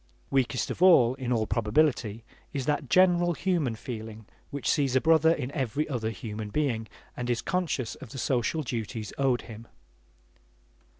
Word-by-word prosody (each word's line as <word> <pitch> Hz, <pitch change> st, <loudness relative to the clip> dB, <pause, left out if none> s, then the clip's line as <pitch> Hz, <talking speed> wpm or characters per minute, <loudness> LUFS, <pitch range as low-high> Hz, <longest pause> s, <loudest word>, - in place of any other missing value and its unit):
Weakest 130 Hz, -3 st, +1 dB
of -, -, -6 dB
all, 150 Hz, -10 st, +7 dB
in 130 Hz, -2 st, -4 dB
all 110 Hz, -3 st, +1 dB
probability, 115 Hz, -1 st, +1 dB, 0.3 s
is 135 Hz, -2 st, -2 dB
that 145 Hz, -2 st, -1 dB
general 175 Hz, -1 st, +4 dB
human 170 Hz, -9 st, 0 dB
feeling 110 Hz, -1 st, -7 dB, 0.2 s
which 140 Hz, -1 st, -5 dB
sees 140 Hz, -4 st, +2 dB
a -, -, +6 dB
brother 160 Hz, +1 st, +4 dB
in 135 Hz, -5 st, -2 dB
every 140 Hz, +1 st, -1 dB
other 120 Hz, -6 st, -2 dB
human 105 Hz, 0 st, -6 dB
being 115 Hz, -4 st, -1 dB, 0.3 s
and 125 Hz, 0 st, -4 dB
is 120 Hz, -2 st, 0 dB
conscious 170 Hz, -9 st, -1 dB
of 130 Hz, -, -11 dB
the 135 Hz, -, -9 dB
social 130 Hz, +4 st, 0 dB
duties 115 Hz, -3 st, -4 dB
owed 130 Hz, -3 st, +2 dB
him. 115 Hz, 0 st, -11 dB
125 Hz, 160 wpm, -28 LUFS, 115-150 Hz, 0.3 s, all